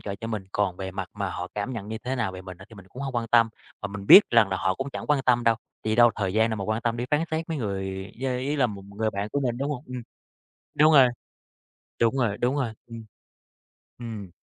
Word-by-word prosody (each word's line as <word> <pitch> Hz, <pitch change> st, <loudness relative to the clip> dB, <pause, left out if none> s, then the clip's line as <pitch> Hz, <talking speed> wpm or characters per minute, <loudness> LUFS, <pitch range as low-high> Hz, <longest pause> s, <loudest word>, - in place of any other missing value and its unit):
trợ 100 Hz, -, -5 dB
cho 115 Hz, -, -4 dB
mình, 110 Hz, -4 st, -4 dB
còn 100 Hz, -3 st, 0 dB
về 95 Hz, 0 st, -5 dB
mặt 95 Hz, -1 st, -5 dB
mà 100 Hz, -3 st, -3 dB
họ 90 Hz, 0 st, -5 dB
cảm 105 Hz, +5 st, -3 dB
nhận 110 Hz, -4 st, -6 dB
như 110 Hz, 0 st, -4 dB
thế 130 Hz, +2 st, -3 dB
nào 110 Hz, -6 st, -1 dB
về 95 Hz, 0 st, -8 dB
mình 95 Hz, -1 st, -9 dB
á 95 Hz, -, -12 dB
thì 115 Hz, -, -14 dB
mình 95 Hz, -2 st, -13 dB
cũng 130 Hz, -, -8 dB
hông 135 Hz, -2 st, -4 dB
quan 115 Hz, -1 st, -1 dB
tâm. 115 Hz, 0 st, +5 dB, 0.3 s
Và 100 Hz, -, -1 dB
mình 100 Hz, 0 st, -7 dB
biết 200 Hz, -, +11 dB
rằng 115 Hz, -4 st, +5 dB
là 95 Hz, -, -1 dB
họ 95 Hz, 0 st, 0 dB
cũng 135 Hz, +5 st, -5 dB
chẳng -, -, -6 dB
quan 150 Hz, -2 st, +2 dB
tâm 120 Hz, -2 st, +2 dB
đâu, 115 Hz, -1 st, +5 dB, 0.3 s
tại 110 Hz, -, -2 dB
vì 110 Hz, -, +1 dB
đâu 120 Hz, 0 st, +7 dB
thời 95 Hz, -3 st, -2 dB
gian 110 Hz, +1 st, +3 dB
đâu 110 Hz, -, -2 dB
mà 100 Hz, -, -4 dB
quan 110 Hz, +3 st, -1 dB
tâm, 115 Hz, 0 st, 0 dB
đi 120 Hz, -, -2 dB
phán 150 Hz, +1 st, +2 dB
xét 160 Hz, +1 st, -2 dB
mấy 160 Hz, -, -2 dB
người 95 Hz, -3 st, -4 dB
yeah, 130 Hz, -1 st, -1 dB
ý 145 Hz, +3 st, -1 dB
là 130 Hz, -, +3 dB
một 100 Hz, -4 st, -7 dB
người 110 Hz, 0 st, 0 dB
bạn 100 Hz, 0 st, -3 dB
của 145 Hz, -, 0 dB
mình, 120 Hz, -3 st, -1 dB
đúng 140 Hz, +2 st, -2 dB
hông? 135 Hz, -4 st, -5 dB
Ừm, 125 Hz, -1 st, -6 dB, 0.7 s
đúng 155 Hz, +1 st, +6 dB
rồi. 135 Hz, -3 st, +8 dB, 0.9 s
Đúng 115 Hz, +3 st, +3 dB
rồi, 115 Hz, -6 st, 0 dB
đúng 125 Hz, +4 st, +1 dB
rồi, 130 Hz, -5 st, -1 dB
ừm. 115 Hz, -1 st, -9 dB, 0.9 s
Ừm. 110 Hz, -5 st, -7 dB
115 Hz, 275 wpm, -26 LUFS, 100-125 Hz, 0.9 s, biết